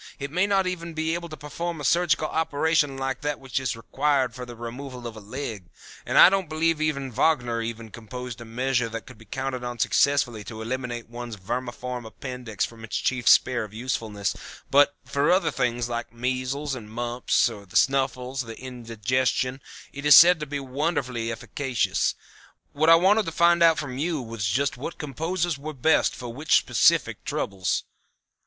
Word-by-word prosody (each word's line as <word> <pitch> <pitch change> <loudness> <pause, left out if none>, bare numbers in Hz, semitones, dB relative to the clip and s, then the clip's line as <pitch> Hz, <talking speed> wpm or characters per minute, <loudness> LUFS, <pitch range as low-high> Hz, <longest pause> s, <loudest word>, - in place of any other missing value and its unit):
It 140 +1 -5
may 180 +5 +2
not 195 -2 +2 0.3
be 160 0 0
able 170 0 -4
to 155 - -8
perform 160 +4 -5
a - - -6
surgical 160 +2 +2
operation 155 -2 +1
like 135 -1 -3
that 150 -1 -2
which 135 -1 -2
is 130 -3 -2
required 135 +1 0
for 125 +1 -7
the 120 - -9
removal 125 +2 -7
of 115 -1 -6
a - - -8
leg, 110 -4 -6 0.4
and - - 0
I - - +11
don't 190 -3 +1
believe 160 0 +1
even 140 -4 -1
Wagner 120 -3 +1
ever 115 0 -5
composed 120 +1 -8
a - - -6
measure 125 +1 0
that 115 0 -6
could 125 -4 -14
be 115 - -15
counted 130 +3 -4
on 120 0 -4
successfully 125 -2 +2
to 110 -2 -8
eliminate 120 0 -4
one's 120 -1 -7
vermiform 120 +3 -5
appendix 125 -3 -4
from 115 -1 -12
its 115 - -3
chief 125 -3 -1
sphere 125 -3 +5
of 105 0 -10
usefulness, 110 -4 -2 0.4
but 145 +1 +5
for 140 +1 +1
other 185 +2 +3
things, 120 -2 -1
like 120 -1 -4
measles, 130 +4 -2
mumps, 120 +1 0
the 105 -4 -4
snuffles, 135 -1 +1
or 115 -1 -8
indigestion, 125 +2 -2 0.3
it 140 - -7
is 150 -1 +8
said 175 0 +8
to 150 - -5
be 145 0 -3
wonderfully 130 -4 -2
efficacious; 125 +1 -1 0.6
What 155 +3 +3
I 165 - +10
wanted 195 +4 +4
to - - -2
find 170 +1 +4
out 165 -1 +6
from 135 -4 -4
you 160 0 0
was 115 -5 -4
just 130 +7 0
what 145 +6 -6
composers 165 +2 -2
were 155 +2 -6
best 150 +4 +2
for 120 -2 -7
which 145 +5 +2
specific - - +2
troubles." 95 -2 -1
130 Hz, 175 wpm, -25 LUFS, 120-150 Hz, 0.6 s, I